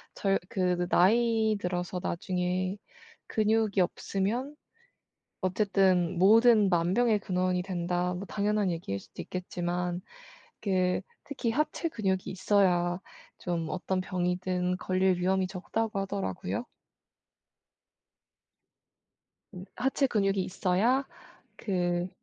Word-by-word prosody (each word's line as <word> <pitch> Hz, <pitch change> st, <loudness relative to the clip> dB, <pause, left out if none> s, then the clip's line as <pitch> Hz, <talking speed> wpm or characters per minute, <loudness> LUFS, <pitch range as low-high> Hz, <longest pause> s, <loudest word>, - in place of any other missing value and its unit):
저 195 Hz, -1 st, +1 dB
요 -, -, +4 dB
그 185 Hz, -5 st, +1 dB
느 175 Hz, 0 st, -1 dB
"나이 220 Hz, +3 st, +3 dB
들어서 180 Hz, -1 st, -2 dB
나중에 180 Hz, +2 st, -1 dB, 0.5 s
근육이 215 Hz, -1 st, +1 dB
없으면 215 Hz, +10 st, -2 dB, 0.9 s
어쨌든 185 Hz, -2 st, +2 dB
모든 215 Hz, +1 st, +6 dB
만병의 195 Hz, +6 st, +2 dB
근원이 185 Hz, -1 st, 0 dB
된다." 180 Hz, -1 st, -1 dB
뭐 180 Hz, +3 st, -5 dB
당연한 205 Hz, -1 st, 0 dB
얘기일 165 Hz, -, -3 dB
수도 -, -, -12 dB
있겠지만 180 Hz, -1 st, -3 dB, 0.6 s
그 185 Hz, -3 st, +1 dB, 0.2 s
특히 265 Hz, -5 st, -2 dB
"하체 305 Hz, +6 st, -1 dB
근육이 190 Hz, -, -1 dB
있어야 180 Hz, -2 st, +2 dB, 0.4 s
좀 170 Hz, -2 st, -2 dB
어떤 185 Hz, +1 st, -1 dB
병이든 180 Hz, 0 st, -1 dB
걸릴 185 Hz, -1 st, +1 dB
위험이 190 Hz, +1 st, +1 dB
적다."고 200 Hz, +3 st, -3 dB
하더라고요. 195 Hz, -, -3 dB, 2.9 s
음. 180 Hz, 0 st, -8 dB
"하체 265 Hz, +2 st, +1 dB
근육이 195 Hz, -4 st, +1 dB
있어야 200 Hz, +9 st, +1 dB, 0.5 s
그 175 Hz, -3 st, -1 dB
185 Hz, 225 characters per minute, -29 LUFS, 180-210 Hz, 2.9 s, 모든